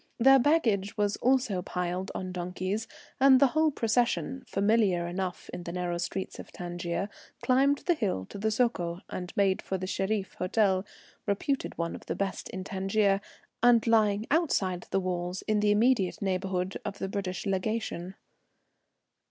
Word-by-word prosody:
Their 270 +3 +7
baggage 230 -9 +2
was 205 -1 +1
also 250 -7 +2
piled 180 +1 -3
on 185 -1 -4
donkeys, 185 +4 -3 0.3
and 265 -1 +7
the 275 - +5
whole 315 +3 +3
procession, 245 +1 0
familiar 200 -4 +2
enough 180 0 -4
in - - -5
the 170 - -6
narrow 175 -1 -2
streets 185 +2 -4
of - - -9
Tangier, 175 +1 -3 0.4
climbed 275 +2 +3
the 350 - +4
hill 195 - -1
to - - -7
the 220 +2 +1
Soko, 190 -7 0
and 180 -1 -5
made 195 -2 +3
for 190 - -3
the 185 - -4
Shereef 195 +1 -1
Hotel, 190 0 +2 0.4
reputed 235 +7 -1
one 170 0 -2
of - - -10
the - - -2
best 195 -1 -3
in 185 - -5
Tangier, 195 +1 +1 0.4
and 240 -1 +5
lying 215 -2 +3
outside 200 - +1
the 195 - +1
walls 180 0 -3
in 215 -1 +1
the 210 0 +2
immediate 210 -2 +3
neighbourhood 190 -1 -1
of 200 - -5
the 195 - -3
British 190 -1 -4
Legation. 190 -2 -2
195 Hz, 160 wpm, -29 LUFS, 185-225 Hz, 0.4 s, Their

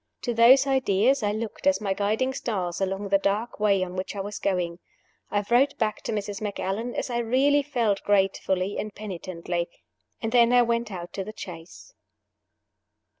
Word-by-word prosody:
To 240 - -1
those 245 +4 +7
ideas 260 -1 +2
I 205 -1 +1
looked 220 +5 -4
as 285 - +4
my 200 -3 -1
guiding 215 +7 0
stars 190 -8 -3
along 195 +1 -2
the 195 0 +4
dark 210 +5 -1
way 200 -3 +3
on 180 0 -6
which 185 +2 -4
I - - -4
was 205 +1 -5
going. 180 -3 -1 0.5
I 205 0 -1
wrote 260 +5 +3
back 215 -2 -1
to - - -4
Mrs. 205 -1 -3
Macallan, 210 +3 -3
as - - -3
I 240 - 0
really 265 +5 +3
felt 235 -8 0
gratefully 195 -1 +1
and 215 - -4
penitently. 175 -3 -4 0.5
And 225 - -3
then 240 0 +5
I 245 0 +6
went 235 -1 -1
out 175 -2 -7
to 195 - -3
the 215 +2 -9
chaise. 175 - -10
210 Hz, 175 wpm, -26 LUFS, 195-235 Hz, 0.5 s, those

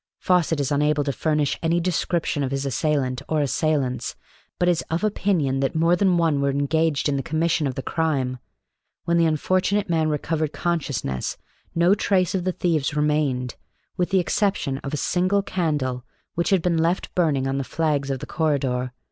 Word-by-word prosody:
Fawcett 175 -4 +1
is 140 -1 -1
unable 150 +1 +2
to 140 - -1
furnish 150 +2 0
any 165 +1 +2
description 170 -3 -1
of 135 - 0
his 135 +1 -2
assailant 135 0 0
or 155 - +1
assailants, 140 -4 0 0.4
but 175 - +1
is 175 -2 +2
of 165 +5 -1
opinion 180 -10 +1
that 135 +2 -1
more 165 +2 +3
than 185 -2 +2
one 160 -4 +2
were 140 - +2
engaged 145 +2 +1
in 140 -1 0
the - - -1
commission 160 +1 0
of 130 - -4
the 135 - -4
crime. 135 -6 -1 0.7
When 170 0 +2
the 165 -1 +4
unfortunate 185 +5 +1
man 160 -1 +2
recovered 155 0 -1
consciousness, 140 - -2 0.4
no 170 +3 +4
trace 190 -3 +1
of 185 -2 -1
the 185 - +1
thieves 160 -5 0
remained, 150 -5 0 0.4
with 180 - 0
the 195 - +2
exception 180 -7 0
of 140 - -6
a 150 - -2
single 185 +6 +1
candle 145 -10 -1 0.3
which 170 - 0
had 190 -5 +2
been 170 -2 +1
left 170 +3 0
burning 150 -7 +1
on 135 +1 -1
the - - -1
flags 145 -1 -1
of 135 - -1
the - - -7
corridor. 130 -5 -1
155 Hz, 180 wpm, -23 LUFS, 140-170 Hz, 0.7 s, the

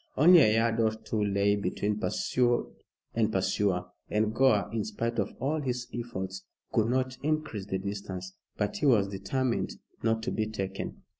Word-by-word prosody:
Only 175 +2 +8
a 110 -8 +5
yard 115 0 +2
or 110 -1 +4
two 110 -1 -2
lay 100 0 +2
between 100 +2 -1
pursued 120 +1 +1 0.4
and 110 -1 +1
pursuer, 95 -1 +1 0.2
and 105 +1 +1
Gore, 115 -7 +4
in 110 -2 0
spite 115 +2 -2
of 100 - -2
all 150 +3 0
his 125 -3 -2
efforts, 95 -5 -5 0.3
could 110 -1 +2
not 130 0 0
increase 150 -10 -2
the 95 - -1
distance. 95 -1 -5 0.2
But - - -1
he 150 - +1
was 105 -7 +4
determined 110 +6 -1 0.3
not 110 0 +1
to 120 - -1
be 110 -1 -1
taken. 95 -2 -5
110 Hz, 165 wpm, -29 LUFS, 100-120 Hz, 0.4 s, Only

